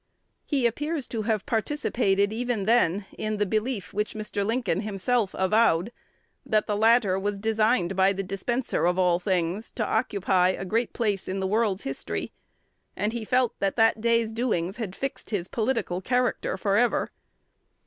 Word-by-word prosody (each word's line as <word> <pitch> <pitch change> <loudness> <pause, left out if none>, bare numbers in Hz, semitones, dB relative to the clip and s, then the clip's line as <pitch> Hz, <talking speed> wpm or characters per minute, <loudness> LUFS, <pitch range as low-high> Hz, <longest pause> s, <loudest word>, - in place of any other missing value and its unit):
He 275 -5 +1
appears 295 +4 -1
to 225 - -2
have 215 -2 -1
participated 220 -5 0
even 235 -3 -2
then 205 -4 +2
in 215 0 -2
the 205 - +1
belief 215 -2 -2
which 210 +2 -2
Mr. 210 -1 -3
Lincoln 225 -4 0
himself 210 +1 -1
avowed, 190 0 +3 0.5
that 215 -1 +1
the 210 - -1
latter 220 -3 +4
was 205 +1 -2
designed 215 -3 +1
by 190 +1 +4
the 195 0 -3
Dispenser 195 +2 -1
of 180 +1 +1
all 180 -2 +3
things 180 +2 -1
to 220 - -1
occupy 190 -4 +1
a 185 - -3
great 225 +5 -1
place 210 -5 -1
in 190 +1 -2
the 190 - -1
world's 205 -1 +1
history; 135 -11 -4 0.6
and 210 +3 -1
he 235 -2 -3
felt 250 +1 +1
that 195 -1 0
that 225 -1 +3
day's 230 -1 +2
doings 215 -5 -1
had 205 -6 -5
fixed 275 0 -5
his 190 -5 -2
political 220 -6 -1
character 250 +4 0
forever. 215 +4 +1
215 Hz, 160 wpm, -26 LUFS, 190-235 Hz, 0.6 s, latter